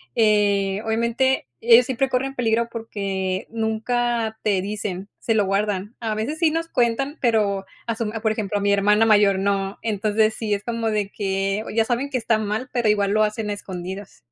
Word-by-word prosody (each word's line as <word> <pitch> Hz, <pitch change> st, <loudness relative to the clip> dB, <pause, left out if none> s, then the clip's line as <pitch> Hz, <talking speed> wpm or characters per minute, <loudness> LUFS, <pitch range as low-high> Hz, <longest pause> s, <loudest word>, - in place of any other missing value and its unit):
eh, 205 Hz, -2 st, +2 dB
obviamente, 235 Hz, -, +1 dB
ellos 235 Hz, +1 st, +6 dB
siempre 260 Hz, +1 st, 0 dB
corren 265 Hz, +1 st, -1 dB
peligro 235 Hz, -2 st, 0 dB
porque 195 Hz, -4 st, -3 dB
nunca 225 Hz, 0 st, -1 dB
te 200 Hz, -3 st, +1 dB
dicen, 200 Hz, -2 st, -4 dB
se 225 Hz, -, 0 dB
lo 205 Hz, -2 st, +3 dB
guardan. 200 Hz, +1 st, -1 dB
A 220 Hz, -2 st, -2 dB
veces 255 Hz, +9 st, -3 dB
sí 330 Hz, -2 st, +4 dB
nos 330 Hz, +1 st, -2 dB
cuentan, 260 Hz, +5 st, 0 dB
pero 210 Hz, -5 st, +1 dB, 0.2 s
a 230 Hz, -, -1 dB
su 225 Hz, -2 st, -2 dB
por 220 Hz, 0 st, -1 dB
ejemplo, 210 Hz, -2 st, -2 dB
a -, -, -2 dB
mi 200 Hz, 0 st, +3 dB
hermana 210 Hz, +2 st, +4 dB
mayor, 205 Hz, -3 st, +5 dB
no. 195 Hz, 0 st, -1 dB
Entonces 215 Hz, 0 st, +1 dB
sí, 210 Hz, -3 st, -1 dB
es 200 Hz, -, -7 dB
como 230 Hz, -1 st, -2 dB
de 210 Hz, -2 st, -1 dB
que, 195 Hz, 0 st, -1 dB
o, -, -, -5 dB
ya 225 Hz, 0 st, +1 dB
saben 250 Hz, +4 st, -1 dB
que 265 Hz, -, -1 dB
está 225 Hz, -2 st, +1 dB
mal, 215 Hz, +4 st, -2 dB
pero 235 Hz, -3 st, +2 dB
igual 200 Hz, -1 st, +2 dB
lo 215 Hz, +1 st, +3 dB
hacen 210 Hz, 0 st, -2 dB
a -, -, 0 dB
escondidas. 190 Hz, 0 st, -7 dB
215 Hz, 195 wpm, -22 LUFS, 200-230 Hz, 0.2 s, ellos